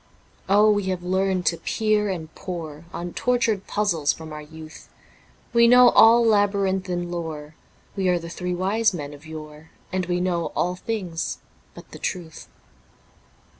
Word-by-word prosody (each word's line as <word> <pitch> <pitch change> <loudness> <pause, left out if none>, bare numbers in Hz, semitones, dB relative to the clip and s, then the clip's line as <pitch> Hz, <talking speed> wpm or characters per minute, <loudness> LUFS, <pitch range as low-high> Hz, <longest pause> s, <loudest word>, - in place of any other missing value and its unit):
Oh, 210 +2 +5
we 205 -2 0
have 185 -2 -2
learnt 185 0 0
to 170 - +2
peer 215 0 0
and 160 -4 -5
pore 165 -4 -7
On 175 0 -6
tortured 235 -5 0
puzzles 175 -9 +1
from 160 -1 -9
our 150 - -7
youth. 155 +1 -12 0.6
We 235 0 +6
know 250 +1 +8
all 230 +1 +6
labyrinthine 195 -4 +1
lore, 160 -3 -5 0.4
We 190 -2 0
are 180 - +3
the 170 -1 -7
three 180 +1 -4
Wise 200 +3 +1
Men 145 -3 -6
of 145 +2 -13
yore, 155 0 -10 0.2
And 185 -2 -1
we 175 0 0
know 175 -2 0
all 180 +1 0
things 180 -5 -4 0.4
but - - -13
the - - -10
truth. 170 -4 -5
180 Hz, 155 wpm, -23 LUFS, 165-205 Hz, 0.6 s, know